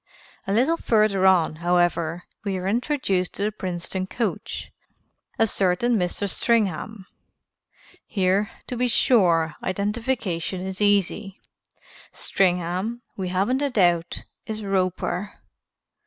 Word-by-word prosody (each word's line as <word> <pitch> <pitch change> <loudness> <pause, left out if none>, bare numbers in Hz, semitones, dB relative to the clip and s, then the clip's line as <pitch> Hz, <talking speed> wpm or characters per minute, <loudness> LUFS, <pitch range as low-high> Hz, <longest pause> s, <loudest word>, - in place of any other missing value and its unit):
A - - -1
little 260 +11 +3
further 210 - +3
on, 170 -4 +3
however, 175 0 +1 0.2
we 195 -2 -1
are 185 +1 -3
introduced 220 -5 0
to 200 - -2
the 210 - +1
Princeton 185 -1 -4
coach, 230 +3 -3 0.7
a 225 - +4
certain 200 +4 +1
Mr. 185 +1 -1
Stringham. 210 -2 0 1.0
Here, 195 0 +1 0.2
to 250 - -5
be 250 +1 +1
sure, 175 -10 +4
identification 200 -3 -2
is 190 +1 -5
easy. 200 -1 +1 0.7
Stringham, 185 +5 0
we 190 -2 -3
haven't 200 +9 +1
a 285 - +1
doubt, 175 -8 +1 0.2
is 215 -1 -4
Roper. 190 0 -1
195 Hz, 110 wpm, -24 LUFS, 180-220 Hz, 1.0 s, a